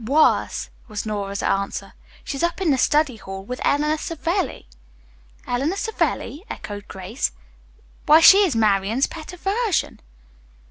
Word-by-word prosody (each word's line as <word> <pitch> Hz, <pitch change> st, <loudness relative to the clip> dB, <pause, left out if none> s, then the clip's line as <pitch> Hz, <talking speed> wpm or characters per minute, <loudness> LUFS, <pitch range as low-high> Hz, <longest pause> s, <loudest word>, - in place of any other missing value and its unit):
"Worse," 285 Hz, +7 st, +2 dB, 0.2 s
was 215 Hz, -2 st, -5 dB
Nora's 200 Hz, -2 st, -3 dB
answer. 195 Hz, 0 st, -2 dB, 0.3 s
"She's 275 Hz, -, -4 dB
up 340 Hz, +1 st, 0 dB
in 360 Hz, -5 st, +2 dB
the 270 Hz, -, +3 dB
study 295 Hz, -5 st, +2 dB
hall 195 Hz, -2 st, -8 dB
with 250 Hz, +3 st, -6 dB
Eleanor 300 Hz, +2 st, +1 dB
Savelli." 335 Hz, -, -2 dB, 0.8 s
"Eleanor 275 Hz, +9 st, -1 dB
Savelli?" 400 Hz, -6 st, -2 dB
echoed 205 Hz, -1 st, -7 dB
Grace. 190 Hz, +7 st, -3 dB, 0.7 s
"Why 305 Hz, +2 st, +8 dB
she 385 Hz, +4 st, +9 dB
is 370 Hz, -, +3 dB
Marian's 215 Hz, +3 st, +2 dB
pet 320 Hz, 0 st, -9 dB
aversion." 395 Hz, +3 st, -1 dB
280 Hz, 130 wpm, -22 LUFS, 210-330 Hz, 0.8 s, she